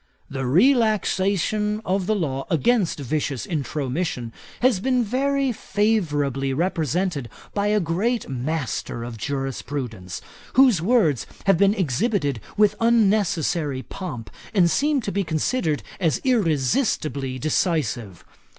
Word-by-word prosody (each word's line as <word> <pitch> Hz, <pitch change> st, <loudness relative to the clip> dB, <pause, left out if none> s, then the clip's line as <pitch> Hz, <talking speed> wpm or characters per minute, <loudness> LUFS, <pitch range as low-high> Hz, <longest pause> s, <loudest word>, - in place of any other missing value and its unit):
'The 135 Hz, -2 st, -3 dB
relaxation 210 Hz, -, +2 dB
of 190 Hz, 0 st, 0 dB
the 215 Hz, -, +2 dB
law 135 Hz, -8 st, -2 dB
against 190 Hz, -, +2 dB
vicious 140 Hz, -3 st, -2 dB
intromission 140 Hz, -4 st, -3 dB, 0.3 s
has 245 Hz, -6 st, +3 dB
been 255 Hz, +3 st, +1 dB
very 270 Hz, +4 st, 0 dB
favourably 150 Hz, -, 0 dB
represented 165 Hz, -3 st, -1 dB, 0.2 s
by 205 Hz, 0 st, 0 dB
a 210 Hz, 0 st, +3 dB
great 200 Hz, +8 st, -1 dB
master 130 Hz, -3 st, -3 dB
of 120 Hz, -1 st, -6 dB
jurisprudence, 125 Hz, -5 st, -4 dB, 0.3 s
whose 250 Hz, -9 st, +5 dB
words 175 Hz, -, +2 dB, 0.2 s
have 195 Hz, -3 st, +4 dB
been 200 Hz, +1 st, +4 dB
exhibited 170 Hz, -, 0 dB, 0.2 s
with 210 Hz, -1 st, +5 dB
unnecessary 195 Hz, -, +2 dB
pomp, 125 Hz, -, -7 dB, 0.2 s
and 175 Hz, -4 st, +4 dB
seem 290 Hz, -, +2 dB
to 205 Hz, -, -3 dB
be 200 Hz, 0 st, 0 dB
considered 160 Hz, -, -1 dB, 0.2 s
as 165 Hz, -5 st, +1 dB
irresistibly 155 Hz, -, +1 dB
decisive. 130 Hz, -, -1 dB
170 Hz, 115 wpm, -23 LUFS, 140-210 Hz, 0.3 s, whose